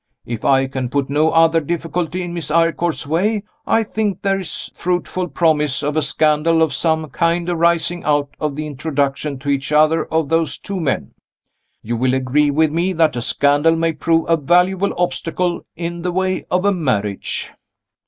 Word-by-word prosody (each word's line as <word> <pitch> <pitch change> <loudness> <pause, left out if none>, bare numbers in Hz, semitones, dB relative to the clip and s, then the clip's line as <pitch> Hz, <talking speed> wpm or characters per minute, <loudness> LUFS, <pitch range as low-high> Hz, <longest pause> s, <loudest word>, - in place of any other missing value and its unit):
If 115 -2 -5
I 135 -1 +3
can 130 -2 -4
put 140 +1 -1
no 155 +2 +3
other 165 0 +4
difficulty 170 +2 -3
in 175 -1 -5
Miss 170 -3 -4
Eyrecourt's 165 0 +1
way, 200 +8 0 0.2
I 225 - +3
think 210 -2 -2
there 195 -1 +1
is 185 - -6
fruitful 180 +1 -2
promise 150 -5 +1
of 145 +1 -1
a 155 - +2
scandal 155 +2 +2
of 155 -4 0
some 160 0 0
kind 170 0 0
arising 170 0 +1
out 145 -1 +1
of 150 -2 -2
the 155 +1 -4
introduction 140 -1 -2
to 140 +2 -6
each 140 +1 -1
other 155 +2 +3
of 160 -2 0
those 165 -3 0
two 200 -2 -5
men. 135 - -2 0.7
You 120 +2 -2
will 130 +2 +1
agree 130 +3 +2
with 155 +1 +2
me 175 +4 0
that 160 -4 +2
a 120 - -2
scandal 145 +6 +2
may 165 0 0
prove 165 +2 +1
a 165 - +3
valuable 180 +5 +2
obstacle 175 0 -2
in 170 +1 -5
the 180 +1 -2
way 185 +1 -1
of 180 +2 +1
a 200 - +4
marriage. 105 - -2
160 Hz, 180 wpm, -19 LUFS, 145-175 Hz, 0.7 s, other